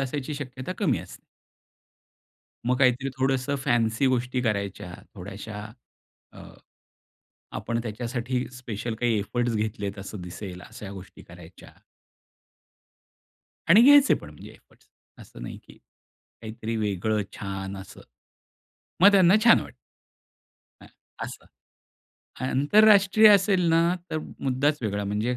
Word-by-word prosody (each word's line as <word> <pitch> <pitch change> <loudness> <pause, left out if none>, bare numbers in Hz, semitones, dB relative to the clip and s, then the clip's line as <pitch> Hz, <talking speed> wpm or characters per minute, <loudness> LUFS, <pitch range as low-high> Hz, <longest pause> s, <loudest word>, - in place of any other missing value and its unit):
असायची 140 +2 -3
शक्यता 135 +2 -6
कमी 145 - +1
असते. 90 - -11 1.5
मग 125 0 +2
काहीतरी 130 0 +2
थोडंसं 135 +1 0
फॅन्सी 115 +2 +1
गोष्टी 125 0 0
करायच्या 100 -5 -3 0.2
थोड्याशा 105 +2 -8 0.7
अ, - - -13 1.2
आपण 115 0 -3
त्याच्यासाठी 120 +3 -3
स्पेशल 115 -2 -5
काही 115 -1 0
एफर्ट्स 120 +3 -2
घेतलेत 105 -2 -3
असं 95 0 -8
दिसेल 90 0 -8
अशा 100 -2 -9
गोष्टी 95 -1 -11
करायच्या. 85 0 -14 2.0
आणि 210 +7 +7
घ्यायचे 285 0 +7
पण 75 - -9
म्हणजे 75 - -13
एफर्ट्स. - - -23 0.3
असं - - -13
नाही, - - -7
की - - -18 0.7
काहीतरी 110 0 -5
वेगळं 105 0 -1
छान 95 -1 -6
असं. 95 - -11 1.0
मग 200 - +9
त्यांना 190 -1 +6
छान 235 - +7
वाटतं. - - -10 1.1
हां, - - -15 0.4
असं. - - -10 1.0
आंतरराष्ट्रीय 205 - +5
असेल 195 -2 +4
ना 165 0 +4 0.3
तर 155 - -1 0.2
मुद्दाच 140 +3 0
वेगळा. 100 -1 -2
म्हणजे 105 +5 -1
120 Hz, 115 wpm, -25 LUFS, 100-140 Hz, 2.0 s, मग